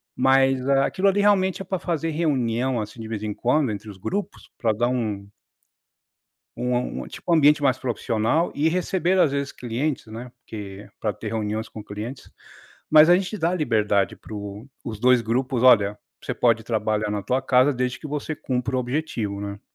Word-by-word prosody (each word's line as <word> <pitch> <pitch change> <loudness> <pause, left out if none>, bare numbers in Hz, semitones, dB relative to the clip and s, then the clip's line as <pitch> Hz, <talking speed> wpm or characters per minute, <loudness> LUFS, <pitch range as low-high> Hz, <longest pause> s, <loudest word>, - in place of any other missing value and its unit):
Mas 135 0 +3
aquilo 140 +8 +2
ali 195 +1 +1
realmente 195 -2 +2
é - - -6
pra 190 - -2
fazer 165 -2 -2
reunião, 130 -6 0
assim, 105 +2 -8
de 110 - -6
vez 110 -2 -4
em 105 -1 -2
quando, 130 +5 +1
entre 105 +1 -7
os 100 - -10
grupos 195 - -5
para 115 - +1
dar 120 +3 +1
um 105 -5 -2 1.3
uma 125 +1 0
um 65 - -5
tipo - - -7
um - - +7
ambiente 150 -1 +5
mais 130 -2 +2
profissional 120 +5 0
e 150 +3 +2
receber 185 +1 0
às 160 - +4
vezes 140 0 -2
clientes, 125 +4 -3
né, 115 +3 -8
porque 100 -3 -9
para 105 - 0
ter - - -7
reuniões 110 0 -2
com 110 - -9
clientes. 110 +6 -7 0.6
Mas 155 +1 +8
a 175 - +8
gente 195 +3 -3
dá 165 -1 +1
a - - 0
liberdade, 105 - +1
para - - -13 0.5
os 110 -3 -5
2 125 0 +5
grupos. 125 +2 -1
Olha, 105 -5 +5 0.3
você - - -3
pode 115 -2 +2
trabalhar 110 -2 -1
na 105 -1 -2
tua 130 +5 0
casa, 130 +2 +4
desde 125 -1 -2
que - - -7
você 150 +2 -3
cumpra 130 0 -2
o - - +1
objetivo, 120 -6 -3
né, 100 0 -6
125 Hz, 190 wpm, -24 LUFS, 110-150 Hz, 1.3 s, Mas